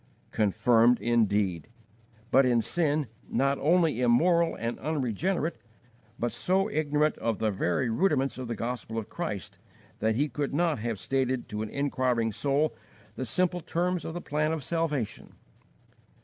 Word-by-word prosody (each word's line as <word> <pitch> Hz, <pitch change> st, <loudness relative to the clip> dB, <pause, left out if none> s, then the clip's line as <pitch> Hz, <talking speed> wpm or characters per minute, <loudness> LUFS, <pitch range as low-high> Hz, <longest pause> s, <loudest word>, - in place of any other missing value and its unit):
Confirmed, 115 Hz, +3 st, +3 dB
indeed! 105 Hz, -7 st, +1 dB, 0.6 s
but 135 Hz, +2 st, +6 dB
in 125 Hz, -2 st, +3 dB
sin, 155 Hz, -3 st, +1 dB, 0.2 s
not 140 Hz, +3 st, +1 dB
only 160 Hz, -4 st, +2 dB
immoral 165 Hz, +8 st, +3 dB
and 115 Hz, +1 st, -4 dB
unregenerate, 155 Hz, -, -1 dB, 0.6 s
but 120 Hz, -, -1 dB
so 190 Hz, +2 st, +1 dB
ignorant 150 Hz, -2 st, +1 dB
of 115 Hz, -3 st, -1 dB
the 110 Hz, -1 st, 0 dB
very 100 Hz, +6 st, 0 dB
rudiments 135 Hz, 0 st, +1 dB
of 130 Hz, -, -5 dB
the 115 Hz, -, -3 dB
Gospel 115 Hz, 0 st, -4 dB
of 110 Hz, -, -4 dB
Christ 105 Hz, -, -5 dB, 0.4 s
that 110 Hz, 0 st, +1 dB
he 145 Hz, +5 st, +1 dB
could 140 Hz, +1 st, -3 dB
not 165 Hz, -4 st, +1 dB
have 115 Hz, 0 st, -2 dB
stated 130 Hz, +5 st, -1 dB
to 105 Hz, -1 st, -4 dB
an 110 Hz, -, -4 dB
inquiring 130 Hz, -4 st, 0 dB
soul 145 Hz, +7 st, 0 dB, 0.4 s
the 130 Hz, -, -4 dB
simple 180 Hz, +7 st, 0 dB
terms 175 Hz, +1 st, -1 dB
of 165 Hz, -, -6 dB
the 175 Hz, -, -4 dB
plan 155 Hz, +1 st, 0 dB
of 160 Hz, -3 st, -3 dB
salvation. 145 Hz, -9 st, -2 dB
135 Hz, 150 wpm, -28 LUFS, 115-155 Hz, 0.6 s, but